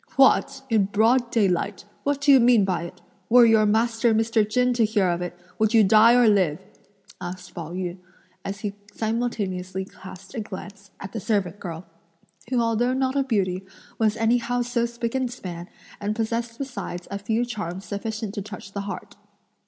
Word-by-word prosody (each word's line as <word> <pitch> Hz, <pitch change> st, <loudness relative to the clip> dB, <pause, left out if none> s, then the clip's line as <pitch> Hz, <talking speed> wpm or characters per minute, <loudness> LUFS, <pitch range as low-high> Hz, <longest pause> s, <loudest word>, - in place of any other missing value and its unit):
"What! 270 Hz, 0 st, +4 dB
in 220 Hz, -5 st, +3 dB
broad 230 Hz, +5 st, +2 dB
daylight! 200 Hz, -3 st, 0 dB, 0.2 s
what 285 Hz, 0 st, -1 dB
do 285 Hz, 0 st, +5 dB
you 270 Hz, -, +8 dB
mean 235 Hz, -4 st, +5 dB
by 180 Hz, -3 st, -1 dB
it? 170 Hz, -, -11 dB, 0.3 s
Were 240 Hz, +1 st, +8 dB
your 220 Hz, -2 st, +5 dB
master 225 Hz, +1 st, +2 dB
Mr. 225 Hz, -1 st, +2 dB
Chen 250 Hz, +2 st, +2 dB
to 235 Hz, -1 st, +2 dB
hear 210 Hz, -3 st, +2 dB
of 175 Hz, 0 st, 0 dB
it, 175 Hz, 0 st, -5 dB, 0.2 s
would 220 Hz, +1 st, +2 dB
you 220 Hz, -, +7 dB
die 220 Hz, +4 st, +6 dB
or 245 Hz, -2 st, +5 dB
live?" 185 Hz, -7 st, +3 dB, 0.6 s
asked 180 Hz, 0 st, -7 dB
Pao 165 Hz, -1 st, -6 dB
yü, 180 Hz, 0 st, -4 dB, 0.4 s
as 200 Hz, +1 st, -5 dB
he 205 Hz, -1 st, -3 dB, 0.2 s
simultaneously 200 Hz, -5 st, -2 dB
cast 190 Hz, -1 st, -12 dB
a 240 Hz, -, -4 dB
glance 200 Hz, -1 st, -8 dB
at 195 Hz, -, -7 dB
the 225 Hz, -, -4 dB
servant 200 Hz, -2 st, -1 dB
girl, 170 Hz, -1 st, -6 dB, 0.6 s
who 255 Hz, -2 st, +1 dB
although 235 Hz, +2 st, +1 dB
not 260 Hz, 0 st, 0 dB
a 280 Hz, -, +3 dB
beauty 195 Hz, -8 st, 0 dB, 0.4 s
was 220 Hz, -1 st, +2 dB
anyhow 245 Hz, +2 st, +1 dB
so 235 Hz, -1 st, 0 dB
spick 235 Hz, 0 st, -4 dB
and 260 Hz, -2 st, 0 dB
span, 180 Hz, -7 st, -7 dB, 0.3 s
and 210 Hz, +1 st, -2 dB
possessed 230 Hz, +1 st, -2 dB
besides 245 Hz, -10 st, -6 dB
a 200 Hz, -, -3 dB
few 220 Hz, +4 st, 0 dB
charms 195 Hz, -5 st, -5 dB
sufficient 215 Hz, 0 st, -4 dB
to 205 Hz, -, -4 dB
touch 200 Hz, -1 st, -9 dB
the 200 Hz, -, -3 dB
heart. -, -, -7 dB
215 Hz, 180 wpm, -24 LUFS, 190-235 Hz, 0.6 s, you